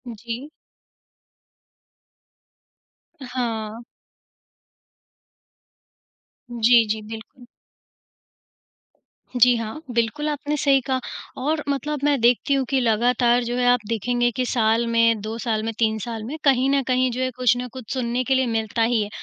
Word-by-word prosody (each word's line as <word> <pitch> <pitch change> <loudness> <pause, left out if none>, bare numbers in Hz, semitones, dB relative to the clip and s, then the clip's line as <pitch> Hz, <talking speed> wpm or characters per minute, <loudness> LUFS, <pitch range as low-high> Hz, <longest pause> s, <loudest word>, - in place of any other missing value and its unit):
जी। 235 +6 -7 2.8
हाँ। 230 -3 -4 2.7
जी, 235 0 +4
जी, 220 0 -2
बिल्कुल। 240 +3 -10 1.9
जी, 245 0 +5
हाँ, 230 +7 -5
बिल्कुल 235 +6 -1
आपने 295 0 -2
सही 275 -2 +3
कहा 260 +1 -1 0.4
और 300 +3 -1
मतलब 290 +2 -2
मैं 290 -2 +2
देखती 245 +4 +3
हूँ 270 -1 +1
कि 270 -1 +2
लगातार 240 +2 +2
जो 240 +1 -3
है 250 - +1
आप 245 0 +5
देखेंगे 240 +2 0
कि 255 -1 0
साल 230 -1 +1
में, 230 -1 +3
2 220 +2 -5
साल 220 -2 -2
में 225 0 -3
3 220 -1 +2
साल 225 -1 -5
में 285 +8 -6
कहीं 270 -1 +3
न 275 0 +2
कहीं 255 0 +2
जो 250 +2 -3
है 255 - 0
कुछ 245 -2 +3
ना 250 0 -4
कुछ 255 -5 -9
सुनने 250 -1 -1
के 265 +1 +1
लिए 260 0 +2
मिलता 225 0 -1
ही 230 -1 +2
है। 205 - -6
245 Hz, 140 wpm, -22 LUFS, 230-260 Hz, 2.8 s, जी